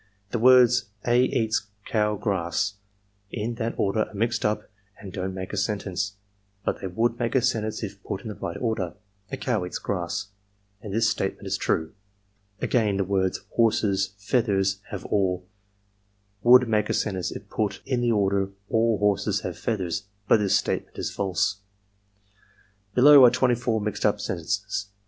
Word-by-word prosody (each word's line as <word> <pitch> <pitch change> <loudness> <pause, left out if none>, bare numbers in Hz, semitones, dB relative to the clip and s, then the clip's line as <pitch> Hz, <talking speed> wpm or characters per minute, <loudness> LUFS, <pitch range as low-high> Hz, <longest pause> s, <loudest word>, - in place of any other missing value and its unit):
'The 120 - -1
words 125 -1 +6 0.2
a 120 +1 +4
eats 110 -4 0 0.2
cow 105 -1 +1
grass 100 0 -1 0.6
in 115 +1 -3
that 115 0 -3
order 105 +2 +1
are - - -17
mixed 115 +2 0
up 105 0 0 0.3
and 95 -4 -9
don't 95 -1 -3
make 95 +1 -6
a - - -2
sentence; 100 -1 -2 0.5
but - - -1
they 95 - -3
would 115 +6 0
make 120 +1 -1
a - - +6
sentence 110 -3 -1
if 100 -1 -6
put 95 - -4
in - - -7
the 105 - -4
right 85 - -5
order: 110 -7 -2 0.4
a 135 - -3
cow 120 -6 -1
eats 90 - -4
grass, 95 +1 -3 0.5
and 105 - -7
this 115 +3 +2
statement - - -2
is - - -1
true. 80 0 -1 0.3
" 100 +1 -39
'Again, 105 -5 +2
the 100 - +1
words 95 -1 0
horses 100 -4 +1
feathers 100 -2 +1
have - - -6
all 95 -3 0 1.0
would 125 +2 +7
make 105 -2 +1
a - - +1
sentence 95 -4 -1
if - - -8
put 100 -3 -2
in 130 -3 0
the 120 -1 +2
order 100 -2 +1 0.2
aU 115 -1 +3
horses 105 0 +1
have - - -4
feathers, 100 -4 -2 0.2
but - - +6
this 100 -3 +3
statement - - -3
is - - -3
false. 95 0 0 0.7
" 100 0 -35
'Below 140 +2 +9
are 125 - +10
24 120 -2 +1
mixed 105 -1 -3
up - - 0
sentences. 100 +3 -2
105 Hz, 170 wpm, -25 LUFS, 95-115 Hz, 1.0 s, are